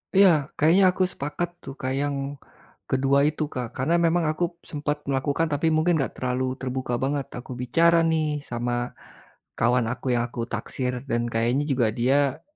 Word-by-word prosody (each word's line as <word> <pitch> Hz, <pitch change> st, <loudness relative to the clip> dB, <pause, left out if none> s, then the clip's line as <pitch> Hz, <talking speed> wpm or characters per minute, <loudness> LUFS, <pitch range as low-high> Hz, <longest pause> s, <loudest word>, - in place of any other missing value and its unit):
Iya, 195 Hz, 0 st, +8 dB, 0.3 s
kayaknya 170 Hz, +6 st, +4 dB
aku 185 Hz, -, +2 dB
sepakat, 155 Hz, +5 st, -3 dB
tuh, 135 Hz, -, -8 dB
Kak, 130 Hz, -, -1 dB
yang 145 Hz, 0 st, -1 dB, 0.7 s
kedua 135 Hz, +1 st, +3 dB
itu, 155 Hz, +1 st, -1 dB
Kak. 125 Hz, -2 st, -3 dB
Karena, 150 Hz, +7 st, +1 dB
memang 170 Hz, 0 st, +2 dB
aku 155 Hz, +3 st, -2 dB, 0.2 s
sempat 150 Hz, 0 st, -3 dB
melakukan, 140 Hz, +4 st, 0 dB
tapi 145 Hz, +3 st, +1 dB
mungkin 160 Hz, +1 st, +3 dB
enggak 135 Hz, -, -2 dB
terlalu 130 Hz, +1 st, -1 dB
terbuka 130 Hz, -1 st, -3 dB
banget 140 Hz, 0 st, -1 dB
aku 125 Hz, +1 st, -8 dB
bicara, 165 Hz, +7 st, +4 dB
nih, 155 Hz, -2 st, 0 dB
sama 120 Hz, 0 st, -2 dB, 0.6 s
kawan 120 Hz, 0 st, +2 dB
aku -, -, -13 dB
yang 120 Hz, -, +1 dB
aku 120 Hz, 0 st, -6 dB
taksir. 125 Hz, +3 st, -3 dB
Dan, 120 Hz, 0 st, 0 dB
kayaknya 120 Hz, +5 st, +1 dB
juga 125 Hz, -4 st, +2 dB
dia 135 Hz, +3 st, +1 dB
135 Hz, 165 wpm, -25 LUFS, 125-155 Hz, 0.7 s, Iya